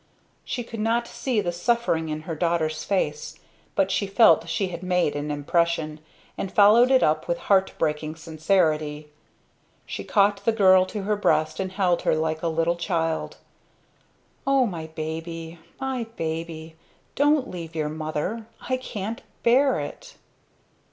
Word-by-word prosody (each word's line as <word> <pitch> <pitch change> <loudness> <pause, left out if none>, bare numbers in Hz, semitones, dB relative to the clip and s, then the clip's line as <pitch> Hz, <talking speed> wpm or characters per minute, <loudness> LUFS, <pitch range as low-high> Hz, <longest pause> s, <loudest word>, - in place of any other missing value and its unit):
She 245 - -4
could 230 -1 -8
not 230 +2 +1
see 245 -6 -1
the 175 -3 -1
suffering 175 -4 0
in 155 0 -3
her 165 +1 -5
daughter's 160 -1 0
face; 455 - -2 0.4
but 195 0 +2
she 200 - 0
felt 190 -5 +5
she 185 +3 -1
had 170 -1 -6
made 180 -5 +1
an 145 +1 -3
impression, 155 +1 0 0.4
and 190 - -3
followed 215 +5 +6
it 265 -1 +5
up 155 0 +1
with 170 - 0
heart 195 0 +2
breaking 155 0 -1
sincerity. 155 -2 0 0.8
She - - -5
caught 200 -1 +2
the 230 - +2
girl 190 -3 +5
to 205 0 -5
her 210 +2 +1
breast 155 -6 +1
and 190 -1 -3
held 185 -3 +1
her - - +2
like 160 0 -1
a 170 - -1
little 165 +1 0
child. 165 -2 -2 1.1
"O 275 -2 +4
my 165 -7 -5
baby! 160 +1 -6 0.2
my 260 -3 -3
baby! 160 0 -5 0.4
Don't 290 -1 +3
leave 165 -2 -7
your 155 -2 -1
mother. 155 +8 -4
I 255 - -2
can't 220 -3 -5 0.2
bear 265 +4 +4
it!" - - -8
170 Hz, 150 wpm, -25 LUFS, 160-210 Hz, 1.1 s, followed